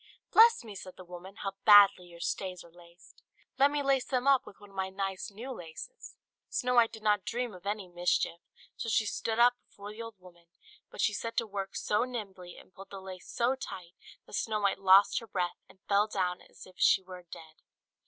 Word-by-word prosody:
"Bless 460 +1 +7
me!" 220 -3 -9
said 185 -1 -10
the 185 - -11
woman, 180 +2 -10
"how 195 - -2
badly 205 -4 +7
your 170 -1 -14
stays 180 +1 -3
are 170 - -17
laced. 175 0 -19 0.4
Let 280 +1 +6
me 290 0 -1
lace 270 -2 +2
them 255 -1 -1
up 270 -2 +4
with - - -13
one 205 -1 -15
of - - -18
my 190 0 -2
nice 195 0 -4
new 230 +6 -8
laces." 180 - -9 0.3
Snow 250 -1 0
White 235 -2 +5
did 220 -1 -11
not 210 -2 +2
dream 240 +1 -3
of 180 +1 -11
any 205 -2 -3
mischief; 175 -1 0 0.3
so 230 - -4
she 220 - +2
stood 220 +1 -2
up 240 +1 +6
before 205 +1 -10
the 215 +2 -9
old 230 -1 -8
woman; 175 -2 -18 0.4
but - - -6
she 210 - +2
set 230 +2 -5
to 230 - +2
work 195 -2 -5
so 210 +2 +1
nimbly, 195 -8 -7
and - - -16
pulled 195 0 -12
the 195 - -8
lace 190 -1 -10
so 240 +2 +1
tight, 190 -9 -8 0.3
that - - -17
Snow 215 +1 -1
White 200 -1 +1
lost 195 +1 +6
her 230 - -12
breath, 180 -4 -2
and - - -19
fell 205 +1 +3
down 185 -4 -2
as - - -13
if 185 -1 -18
she 190 - +5
were 185 -1 -10
dead. 160 -1 -11
200 Hz, 220 wpm, -30 LUFS, 185-230 Hz, 0.4 s, Bless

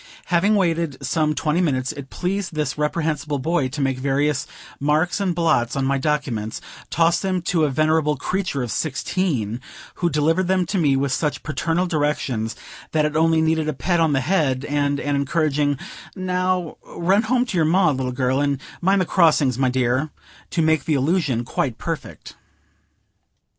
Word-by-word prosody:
Having 200 +5 +4
waited 170 -6 0
some 155 +2 +1
twenty 155 +3 +1
minutes, 135 -6 0
it 140 -2 -9
pleased 185 -1 -3
this 150 -4 -1
reprehensible 150 -1 -1
Boy 145 0 0
to 140 +3 -5
make 135 -1 0
various 140 +1 0 0.3
marks 155 +7 +1
and 185 -4 0
blots 140 -8 +1
on 135 -1 0
my 140 0 +1
documents, 130 -7 -2 0.3
toss 165 +1 +3
them 185 -3 -1
to 165 -3 +2
a - - +1
venerable 155 +1 +2
creature 180 -5 -2
of 120 - -4
sixteen, 135 - -1 0.4
who 175 - +3
delivered 165 +4 +1
them 185 -1 +2
to 195 +3 -1
me 145 -5 +3
with 135 0 0
such 150 +2 -1
paternal 165 +4 0
directions, 145 -8 -1 0.4
that 155 -1 +3
it 150 0 -2
only 160 0 +3
needed 160 -1 +1
a - - -1
pat 170 +7 0
on 160 -3 +3
the 135 - +2
head 140 -4 +1
and 145 -1 0
an 145 0 -1
encouraging 145 0 +1 0.4
"Now 185 -2 -1
run 190 +4 +1
home 245 +2 +1
to 235 - -5
your 165 -3 +3
Ma, 175 0 +4
little 130 -2 -2
girl, 130 +1 0
and 140 -2 0 0.2
mind 190 +2 +3
the - - +1
crossings, 150 -7 +3
my 130 -1 +3
dear," 130 +3 0 0.4
to 165 - 0
make 160 -1 +2
the 155 - +1
illusion 140 -4 +1
quite - - -2
perfect. - - -6
155 Hz, 175 wpm, -22 LUFS, 135-170 Hz, 0.4 s, Having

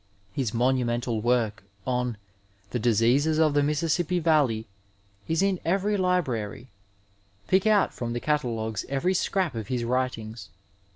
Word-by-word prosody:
His 125 -4 -1
monmnental 120 -1 0
work 115 -3 +1 0.2
on 125 -3 -1 0.5
The 125 - -1
Diseofes 120 +7 +3
of 155 -2 +3
the 145 - +3
Mississippi 160 +4 +1
Vcdley 145 -9 +2 0.6
is 160 +3 +1
in 195 -2 +1
every 195 +4 +1
library; 130 - -1 0.8
pick 190 +3 +3
out 210 -2 +3
from 120 -1 -4
the 120 - -2
catalogaes 115 -8 -1
every 140 +7 +1
scrap 185 -3 0
of 110 -3 -5
his 125 -2 -1
writings. 120 -2 -2
130 Hz, 130 wpm, -26 LUFS, 115-160 Hz, 0.8 s, Diseofes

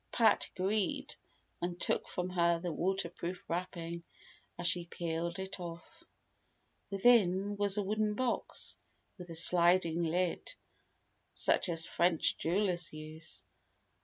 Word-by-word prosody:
Pat 225 -2 +4
agreed, 195 +1 -1 0.5
and 175 0 -3
took - - 0
from 180 0 -4
her 170 -1 +2
the 170 +1 -4
waterproof 180 0 -3
wrapping 170 -1 -4 0.6
as 175 - -4
she 170 +1 +4
peeled 170 +1 -3
it 190 0 -5
off. 175 - -9 0.9
Within 200 -2 +3
was 200 0 +3
a 205 - +1
wooden 210 +1 0
box, 255 +1 -2 0.4
with 180 -1 -9
a 165 - -6
sliding 170 0 +4
lid, 175 - -1 0.8
such - - +3
as 165 -1 +2
French 170 -2 +2
jewellers 180 0 0
use. 155 +1 -7
180 Hz, 120 wpm, -33 LUFS, 170-195 Hz, 0.9 s, Pat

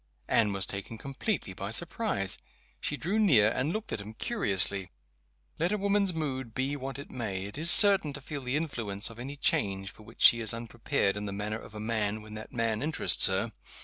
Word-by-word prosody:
Anne 105 -3 +2
was 100 -2 +2
taken 100 +4 -5
completely 135 - -3
by 100 +2 -6
surprise. 170 - 0 0.4
She 145 - -3
drew 195 +9 -1
near, 130 - +5
and 135 +7 -1
looked 215 +3 -4
at 100 - -3
him 105 +2 -10
curiously. 100 - -1 0.7
Let 170 +4 +1
a 210 - +1
woman's 200 -1 +1
mood 130 -8 -4
be 135 +2 -1
what 135 -1 -6
it 140 - -10
may, 100 -6 -4
it 100 - -6
is 160 +3 +2
certain 195 -4 +7
to 145 - -6
feel 145 +1 -6
the 125 +2 -1
influence 115 -9 -2
of 115 - -13
any 135 +4 -7
change 100 -6 0
for - - -17
which 110 +2 -6
she 115 - +8
is 115 -1 +3
unprepared 115 -2 -1
in 105 0 -4
the - - -4
manner 105 +2 -4
of 110 - -13
a - - -6
man 110 -1 -2
when 105 0 -11
that 110 0 -9
man 115 -2 -1
interests 155 +3 +5
her. 95 +4 -1
115 Hz, 210 wpm, -29 LUFS, 105-150 Hz, 0.7 s, she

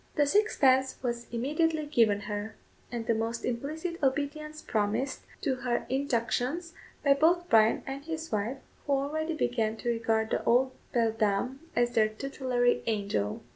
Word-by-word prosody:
The 295 - +4
sixpence 275 -8 +3
was 240 -1 -2
immediately 305 +6 0
given 225 -8 +3
her, 210 +1 -5 0.4
and 235 -2 -3
the 230 - +2
most 225 +1 -2
implicit 315 +8 -3
obedience 300 +3 -1
promised 220 +5 -1 0.2
to 265 -4 0
her 245 -1 -1
injunctions 265 +5 -1 0.3
by 280 -2 +6
both 340 +5 +3
Bryan 220 0 +5
and 275 +1 -5
his 320 +1 -5
wife, 215 +5 -1 0.3
who 285 - +2
already 310 +4 -1
began 225 -6 0
to 240 - -3
regard 225 -1 0
the - - 0
old 255 +2 +3 0.2
beldame 225 +2 +1 0.2
as 240 0 +2
their 215 -2 +3
tutelary 245 +1 0
angel. 200 - -1
250 Hz, 145 wpm, -29 LUFS, 225-290 Hz, 0.4 s, by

